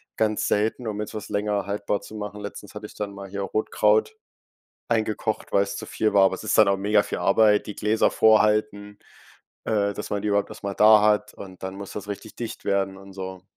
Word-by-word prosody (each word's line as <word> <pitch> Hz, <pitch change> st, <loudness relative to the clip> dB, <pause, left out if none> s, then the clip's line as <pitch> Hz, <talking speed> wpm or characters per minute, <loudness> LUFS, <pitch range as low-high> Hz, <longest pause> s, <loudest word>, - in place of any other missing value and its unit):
ganz 110 Hz, -1 st, 0 dB
selten, 110 Hz, +4 st, 0 dB
um 105 Hz, -1 st, -3 dB
jetzt 105 Hz, -, -6 dB
was 105 Hz, -1 st, -6 dB
länger 105 Hz, -1 st, -1 dB
haltbar 100 Hz, 0 st, -2 dB
zu -, -, -12 dB
machen. 105 Hz, 0 st, -6 dB
Letztens 100 Hz, 0 st, -9 dB
hatte 105 Hz, 0 st, -7 dB
ich -, -, -11 dB
dann 100 Hz, -1 st, -5 dB
mal 100 Hz, 0 st, -9 dB
hier 100 Hz, +1 st, -5 dB
Rotkraut 435 Hz, -, +1 dB, 0.7 s
eingekocht, 110 Hz, -1 st, -1 dB
weil's 100 Hz, 0 st, +1 dB
zu -, -, -6 dB
viel 110 Hz, -1 st, -1 dB
war, 100 Hz, -1 st, +6 dB
aber 95 Hz, -, +1 dB
es 110 Hz, -, -10 dB
ist -, -, +1 dB
dann 105 Hz, -2 st, +6 dB
auch 100 Hz, -, +2 dB
mega 105 Hz, +1 st, +2 dB
viel -, -, -4 dB
Arbeit, 105 Hz, +1 st, +3 dB
die 105 Hz, -, -6 dB
Gläser 110 Hz, +1 st, +2 dB
vorhalten, 105 Hz, -1 st, +2 dB, 0.7 s
äh, 100 Hz, -2 st, +1 dB
dass 105 Hz, -, -6 dB
man 100 Hz, -1 st, -2 dB
die 105 Hz, -, -1 dB
überhaupt 100 Hz, 0 st, +1 dB
erst -, -, -11 dB
mal 100 Hz, -1 st, -3 dB
da 110 Hz, +1 st, +7 dB
hat 105 Hz, 0 st, +2 dB
und 95 Hz, -2 st, -11 dB
dann 95 Hz, +1 st, -5 dB
muss 100 Hz, -1 st, -8 dB
das 105 Hz, 0 st, -7 dB
richtig 105 Hz, +2 st, -7 dB
dicht 115 Hz, -2 st, -7 dB
werden 95 Hz, -1 st, 0 dB
und 95 Hz, 0 st, -13 dB
so. 95 Hz, -1 st, -7 dB
105 Hz, 220 wpm, -24 LUFS, 100-105 Hz, 0.7 s, da